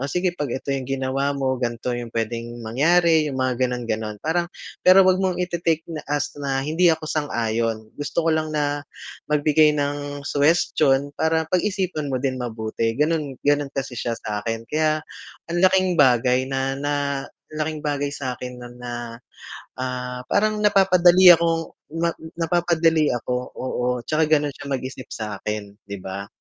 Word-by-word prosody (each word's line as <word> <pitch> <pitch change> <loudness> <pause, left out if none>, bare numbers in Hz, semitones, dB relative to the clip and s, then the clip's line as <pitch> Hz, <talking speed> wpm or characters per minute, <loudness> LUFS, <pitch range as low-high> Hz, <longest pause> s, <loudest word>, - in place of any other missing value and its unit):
"O 135 - -2
sige, 180 +2 0
'pag 145 -4 -2
ito 140 +1 -3
yung 135 -1 -3
ginawa 135 +1 -1
mo, 130 -1 0
ganito 120 +1 -2
yung 120 -1 -5
puwedeng 115 +1 -3
mangyari," 160 +6 +3
yung 135 - -4
mga 130 -1 0
gano'n-gano'n. 110 -3 -3
Parang 170 +2 0 0.4
pero 185 +1 +8
'wag 185 0 +3
mong 185 -2 0
ite-take 170 -2 0
na 160 -2 -5
as 145 -1 -1
na 135 -1 -1
hindi 165 +4 +3
ako 160 0 -4
sang-ayon, 115 -7 -1
gusto 145 +3 -2
ko 165 - +3
lang 155 0 -1
na 145 0 0 0.5
magbigay 150 0 +4
ng 145 0 -3
suhestiyon 145 -2 +2
para 160 0 +1
pag-isipan 185 -5 0
mo 130 - +1
din 130 -1 -1
mabuti, 115 -1 -2
gano'n. 150 -2 0
Gano'n 145 0 +2
kasi 135 -2 -3
siya 115 -1 -2
sa 105 -1 -4
akin 115 0 -3
kaya 155 0 +1 0.5
ang 175 - 0
laking 185 -1 +4
bagay 130 -2 +4
na 135 0 -1
na 145 +1 -1 0.6
laking 155 0 -3
bagay 145 -1 -1
sa'kin 125 -2 -5
no'n 120 0 -10
na, 120 -1 -6 0.6
ah, 125 -1 -3
parang 215 +1 +1
napapadali 185 -2 +7
akong 165 0 -1 0.3
na 170 - +2 0.3
napapadali 165 -2 +2
ako, 125 +1 -2 0.2
oo, 130 -1 -3 0.2
tsaka 155 0 +1
gano'n 150 -2 +2
siya 145 - -9
mag-isip 130 0 -7
sa'kin, 105 -1 -5
'di 100 0 -5
ba? 100 +1 -6
145 Hz, 155 wpm, -23 LUFS, 125-160 Hz, 0.6 s, pero